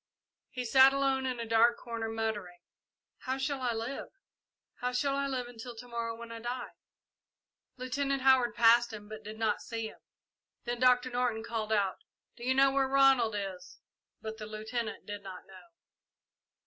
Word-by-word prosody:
He 250 -1 -5
sat 265 +3 +7
alone 270 -1 +1
in 250 -2 -3
a 230 - -3
dark 230 +1 +4
corner, 230 -2 -4
muttering, 220 -5 -3 0.6
"How 260 0 -3
shall 270 0 -2
I 245 -2 +1
live! 230 +4 -4 0.7
How 250 0 -2
shall 275 +2 +1
I 280 0 0
live 255 -3 -2
until 240 0 -9
to 245 +2 -10
morrow, 230 -1 -3
when 235 0 -9
I 230 - -6
die!" 245 +2 -4 1.1
Lieutenant 275 +1 -1
Howard 255 -4 +4
passed 235 +1 +5
him, 210 -1 -9
but 215 0 -9
did 215 +1 -8
not 220 -2 0
see 225 -1 -4
him. - - -16 0.6
Then 240 0 -3
Doctor 250 0 +4
Norton 245 -2 0
called 225 -2 -3
out, 200 -3 +1 0.4
"Do 235 - -11
you 260 +1 +1
know 270 0 +5
where 270 0 +2
Ronald 265 -5 +4
is?" 190 -3 -6 0.5
but 220 0 -6
the 215 - -6
Lieutenant 220 +2 -4
did 205 -1 -6
not 190 -2 -9
know. 190 - -15
235 Hz, 175 wpm, -31 LUFS, 220-255 Hz, 1.1 s, sat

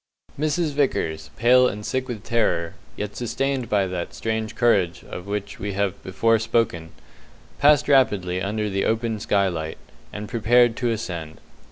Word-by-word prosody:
Mrs 155 +1 0
Vickers, 80 - -1
pale 125 +3 +5
and 105 -3 -5
sick 130 0 -2
with 115 -5 -6
terror, 85 -9 0 0.2
yet 105 0 -4
sustained 130 +2 -2
by 100 -2 +2
that 90 -2 -5
strange 110 0 -3
courage 95 -7 +2
of 90 +2 -8
which 100 0 -4
we 100 0 -3
have 100 -1 -1
before 115 +4 +2
spoken, 110 -7 0 0.7
passed 145 0 +5
rapidly 105 -10 +3
under 105 +2 -1
the 100 -1 -1
open 115 -1 0
skylight, 90 -7 0 0.3
and 105 0 -6
prepared 120 +1 +3
to 120 -2 0
ascend. 85 -8 -4
105 Hz, 150 wpm, -23 LUFS, 95-120 Hz, 0.7 s, pale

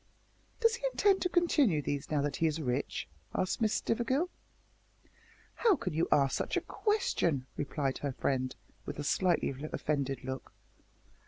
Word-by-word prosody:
"Does 460 -1 +5
he 485 +1 -3
intend 400 -4 +3
to 360 - +1
continue 300 - +3
these 145 -1 -3
now 150 -2 +1
that 145 -1 -1
he 165 - +3
is 155 0 -1
rich?" 130 -1 -2 0.3
asked 185 +5 0
Miss 220 -1 +3
Stivergill. 260 +9 0 1.2
"How 445 -5 +4
can 185 - -4
you 165 +2 +1
ask 135 -2 +4
such - - -1
a - - +1
question?" 170 - 0
replied 140 -2 -2
her 140 -2 -2
friend, 130 0 -1 0.3
with 145 - -6
a 145 - -3
slightly 175 -1 +2 0.2
offended 140 -3 -1
look. 130 0 -6
155 Hz, 155 wpm, -32 LUFS, -, 1.2 s, Does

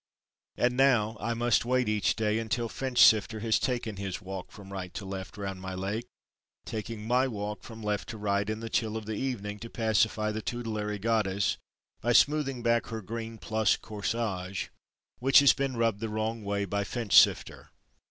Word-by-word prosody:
And 125 0 +2
now 120 -5 +3
I 115 +2 -2
must 120 0 +2
wait 125 0 +1
each 105 -1 +1
day 110 0 0
until 115 +1 -1
Finchsifter 110 -2 +4
has 110 -1 +2
taken 120 -5 -2
his 95 -2 -4
walk 95 0 -7
from 100 -1 -11
right 90 -2 -5
to 100 - -5
left 95 +1 -6
round 95 -2 -5
my 95 0 -5
Lake, 100 +6 -3 0.6
taking 110 0 -5
my 125 +2 +3
walk 105 -3 -4
(from 115 -1 -10
left 105 -1 -2
to 115 - -6
right) 100 0 0
in 110 +1 -3
the 115 - -5
chill 110 -2 0
of 110 - -6
the 110 - -4
evening 105 -4 -3
to 115 - -8
pacify 110 -1 +1
the 110 +1 -4
tutelary 110 -3 -3
Goddess 100 -3 0 0.4
by 120 +1 +2
smoothing 135 -3 +3
back 115 -1 +2
her 110 -1 -5
green 115 +2 -6
plush 110 0 +1
corsage, 100 -3 -3 0.5
which 135 +2 +5
has 140 -1 +8
been 135 -3 -2
rubbed 115 -3 +1
the 115 0 -3
wrong 110 +1 -2
way 100 0 -1
by 100 +1 -1
Finchsifter. 105 0 +3
110 Hz, 180 wpm, -29 LUFS, 100-115 Hz, 0.6 s, has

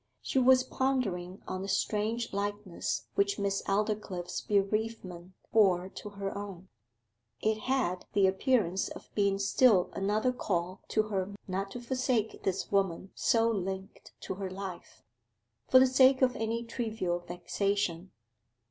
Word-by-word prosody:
She 265 - +1
was 255 0 +6
pondering 205 -10 -1
on 185 - -3
the 195 - -4
strange 215 +4 -1
likeness 200 - -3
which 200 +5 +1
Miss 200 -1 0
Aldclyffe's 200 -3 -1
bereavement 200 -3 -1 0.2
bore 190 -4 +4
to 210 - -8
her 200 -1 -5
own; 195 -2 -7 0.7
it 220 0 +1
had 230 -7 -1
the 200 -1 +4
appearance 190 -1 +2
of - - -11
being 200 -1 +2
still 200 -1 +4
another 210 +5 +1
call 185 -5 -2
to 215 - +2
her 200 -2 -3
not 195 +1 -2
to 245 - -7
forsake 245 -3 -1
this 190 0 -2
woman 195 -2 0
so 230 -1 +2
linked 190 -1 -5
to - - -4
her 190 0 -5
life, 190 -1 -8 0.6
for - - +7
the 260 - +8
sake 260 +1 +5
of 250 -1 +3
any 225 +1 -2
trivial 220 -7 -2
vexation. 180 +1 -2
200 Hz, 140 wpm, -30 LUFS, 190-225 Hz, 0.7 s, the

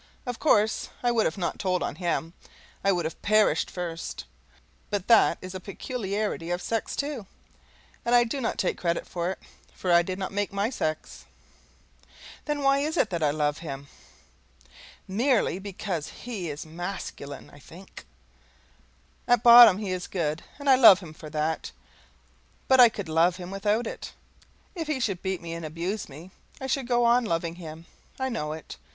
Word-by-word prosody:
Of 245 -2 -4
course 215 -7 +2
I 245 - +3
would 230 -2 +2
not 180 - -1
have - - -21
told 185 -2 0
on - - -4
him, 170 -2 -2 0.5
I 195 - +4
would 175 -3 0
have 160 - -5
perished 215 +1 +3
first; 170 -2 -5 0.6
but 205 -2 -2
that 230 -2 +5
is 185 0 -8
a 185 - -5
peculiarity 200 -3 -4
of 175 0 -1
sex, 225 +3 -2
too, 280 -8 -4 0.8
and 240 +1 +2
I 240 - +7
do 250 +4 -3
not 230 - -2
take 185 - -1
credit 170 -1 -1
for 175 -1 -3
it, 190 - -4 0.4
for 185 - -2
I 170 0 +7
did 185 +1 -4
not 190 -1 -4
make 205 0 -2
my 200 +4 -1
sex. 155 -10 -4 1.2
Then 295 -1 -2
why 275 0 +4
is 305 +3 -2
it 215 - +2
that 170 -2 -2
I 150 - +3
love 150 0 0
him? 140 -3 -7 1.2
MERELY 225 -2 +1
BECAUSE 190 -5 -4
HE 210 -9 -6
IS 145 +2 -6
MASCULINE, 165 -4 -7
I 145 - -15
think. 175 +7 -13 1.2
At 245 -2 +3
bottom 235 -5 +10
he 205 -3 -4
is 185 -1 -3
good, 160 -3 -2
and 285 0 -8
I 265 -1 +7
love 215 -7 +9
him 160 -4 -10
for 155 0 -10
that, 155 +1 -2 1.0
but 260 -1 +5
I 245 -2 +10
could 205 -5 -6
love 165 +2 +3
him 180 0 -8
without 210 +4 0
it. - - -7 0.6
If 330 -5 -5
he 305 -4 -1
should 200 -7 -1
beat 190 -2 -3
me 165 -1 -5
and 165 0 -6
abuse 170 +6 -4
me, 160 +7 -11 0.3
I 265 - -5
should 265 -1 -1
go 240 -1 +2
on 240 +1 +4
loving 170 -4 -1
him. 165 -1 -9 0.3
I 265 0 -1
know 150 -11 -3
it. 160 -1 -9
190 Hz, 180 wpm, -27 LUFS, 170-235 Hz, 1.2 s, bottom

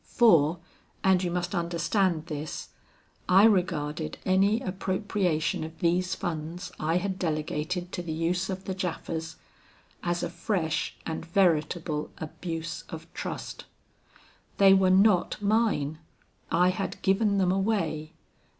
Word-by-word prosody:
For 170 -8 +4 0.5
and 190 -1 +4
you 175 - 0
must 175 +1 -2
understand 170 0 0
this 150 0 -5 0.6
I 190 +2 +7
regarded 165 -7 +1
any 195 +4 +3
appropriation 185 -6 -1
of 160 +1 -8
these 180 +3 +1
funds 165 +3 -4
I 160 +3 +1
had 190 +1 -2
delegated 160 +2 -2
to - - -3
the 170 -2 -5
use 170 +4 -1
of 190 0 -4
the 190 - -2
Japhas, 165 -3 -4 0.7
as 175 0 -1
a - - -1
fresh 170 -2 -1
and 160 -1 -4
veritable 165 -3 +1
abuse 165 +1 -5
of - - -9
trust. - - -6 0.9
They 195 -1 +7
were 190 -1 +4
not 190 0 +4
mine. 205 -8 +1 0.5
I 180 +2 +4
had 185 +1 -3
given 200 +1 +3
them 185 -2 +3
away. 185 -6 -1
175 Hz, 125 wpm, -28 LUFS, 160-190 Hz, 0.9 s, I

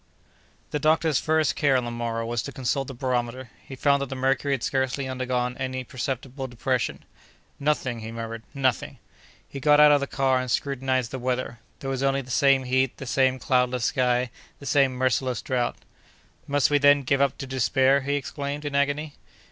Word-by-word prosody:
The 150 - -1
doctor's 155 -1 +2
first 155 -1 +1
care, 140 -3 +3
on 125 - -1
the 120 - -4
morrow, 115 -1 -3
was 120 0 -1
to 140 - -6
consult 135 +1 -2
the 135 - -7
barometer. 125 0 -2
He 135 - -9
found 140 +1 +2
that 140 - -2
the 135 - -4
mercury 135 +2 +1
had 130 - -7
scarcely 130 0 -1
undergone 125 -1 -2
any 130 0 -3
perceptible 130 +2 -4
depression. 125 +1 -2 0.5
"Nothing!" 140 -5 0
he 110 0 -7
murmured, 115 0 -6
"nothing!" 130 -3 0 0.5
He 140 - -7
got 150 +1 +5
out 150 0 +8
of 145 - +5
the 140 - -3
car 130 -1 +1
and 130 0 -4
scrutinized 130 0 -1
the 130 - -4
weather; 125 -1 -2 0.2
there 135 - -4
was 135 -1 -2
only 135 0 +1
the 130 - -10
same 135 +1 +4
heat, 130 0 0
the 135 - -7
same 130 +1 +2
cloudless 125 -2 +1
sky, 125 -1 +1 0.3
the 140 - -12
same 140 -2 +3
merciless 130 0 0
drought. 125 -2 -1 0.7
"Must 145 0 +2
we, 145 - +4
then, 145 0 +5
give 135 +2 +1
up 140 - +2
to - - -5
despair?" 135 +1 +2
he 140 +2 -1
exclaimed, 145 +1 -4
in 145 - -3
agony. 145 +2 0
130 Hz, 190 wpm, -25 LUFS, 125-140 Hz, 0.7 s, out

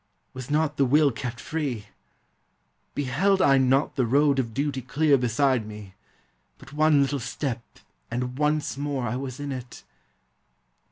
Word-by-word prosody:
Was 130 0 -8
not 150 0 +1
the 140 - +4
will 145 +2 +4
kept 120 0 -5
free? 140 -10 -3 1.1
Beheld 160 +9 +1
I 135 -6 +5
not 135 +3 +2
The 130 - +2
road 140 +2 +3
of 115 -3 -1
duty 140 +1 -2
clear 145 +3 +2
beside 125 -1 +1
me 105 -3 -10 0.3
— - - -43
but - - -15
One 155 -1 +4
little 140 +1 -1
step 125 0 -3 0.5
and 125 +1 -3
once 150 -2 0
more 140 -3 -2
I 120 +1 -2
was 130 0 -5
in 145 -1 -4
it! 125 -2 -8
135 Hz, 155 wpm, -25 LUFS, 125-145 Hz, 1.1 s, I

